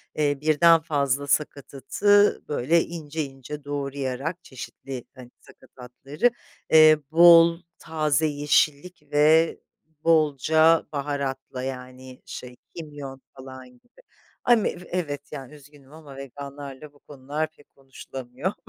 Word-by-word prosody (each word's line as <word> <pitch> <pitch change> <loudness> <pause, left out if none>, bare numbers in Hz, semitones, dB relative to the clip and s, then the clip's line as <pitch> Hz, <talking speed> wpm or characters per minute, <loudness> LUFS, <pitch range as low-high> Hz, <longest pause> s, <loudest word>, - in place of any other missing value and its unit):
eee, 145 -2 0
birden 160 +2 +5
fazla 145 -3 -1
sakatatı 150 +8 +1
böyle 155 +4 +2
ince 160 -2 -5
ince 135 +2 -9
doğrayarak 140 +3 -4
çeşitli, 130 -1 -9
hani, 125 -1 -13
sakatatları, 135 - -4 0.4
eee, 155 -1 +7
bol 170 0 +7 0.2
taze 155 -1 0
yeşillik 150 +2 0
ve 155 +2 +4 0.4
bolca 160 0 +3
baharatla 140 -3 -4
yani 130 0 -8
şey 125 -1 -9 0.2
kimyon 145 -5 -9 0.2
falan 130 -1 -11
gibi. 125 - -24 0.4
Ami 235 -4 +3
ev 180 - -8
evet 145 -6 -4
yani 135 -1 -9
üzgünüm 145 -1 -18
ama 150 -4 -13
veganlarla 140 +1 -9
bu 145 - -24
konular 145 +3 -5
pek 145 - -24
konuşulamıyor. 135 +3 -7
145 Hz, 110 wpm, -24 LUFS, 135-160 Hz, 0.4 s, eee